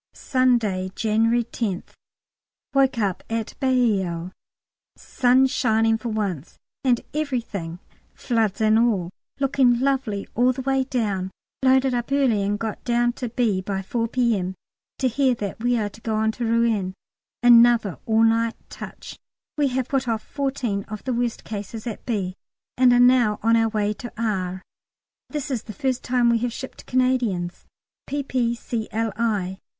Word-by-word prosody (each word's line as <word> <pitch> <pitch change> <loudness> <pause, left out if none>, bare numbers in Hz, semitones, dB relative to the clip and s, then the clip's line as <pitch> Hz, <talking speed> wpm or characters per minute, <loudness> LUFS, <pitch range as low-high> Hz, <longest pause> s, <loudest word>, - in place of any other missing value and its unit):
Sunday, 235 -8 +1
January 225 +2 +2
10th. 220 -5 -4 0.8
Woke 270 -2 +3
up 200 -5 -1
at 225 -1 -3
Bailleul, 195 -10 +1 0.6
sun 255 +1 +3
shining 225 -3 +2
for 235 - -4
once, 195 -9 -3 0.3
and 250 -3 +2
everything 235 - -3 0.4
floods 225 -5 0
and 220 0 +4
all 200 -7 +1 0.3
looking 260 -3 +3
lovely 255 -7 -1
all 250 +2 +3
the 260 +1 -6
way 270 0 +1
down. 205 -8 -1 0.3
Loaded 265 0 +4
up 240 +2 -2
early 265 -7 +3
and 200 +1 0
got 220 0 -5
down 240 0 +1
to 245 -1 -5
B. 225 -5 0
by 195 0 -3
4 230 +4 -1
P.M. 225 -7 0 0.4
to 260 - +1
hear 255 +1 +2
that 205 -2 -5
we 245 +1 +1
are 210 -2 -1
to 220 - -16
go 220 -1 -2
on 220 0 +2
to 235 +2 -4
Rouen 225 -5 +1 0.5
another 235 - +6
all 225 0 +4
night 225 0 +2 0.2
touch. - - -9 0.4
We 295 -2 +2
have 260 -1 -1
put 270 -2 -1
off 225 -2 -1
the - - -31
fourteen 265 -8 -1 0.2
worst 240 -2 -1
cases 215 +1 -6
at 230 -3 -5
B., 195 -6 -1 0.4
and 250 -1 +5
are 245 - +5
now 245 -4 +5
on 230 +1 +4
our 225 0 +3
way 210 -1 0
to 240 - -6
R. 190 -4 -2 0.7
This 295 -2 -4
is 245 -4 -1
the 215 - -9
first 255 +4 -1
time 245 -1 +2
we 230 - +2
have 245 +1 -1
shipped 260 +3 -9
Canadians, 245 -9 0 0.4
P.P.C.L.I. 230 -6 -2
230 Hz, 150 wpm, -23 LUFS, 210-250 Hz, 0.8 s, another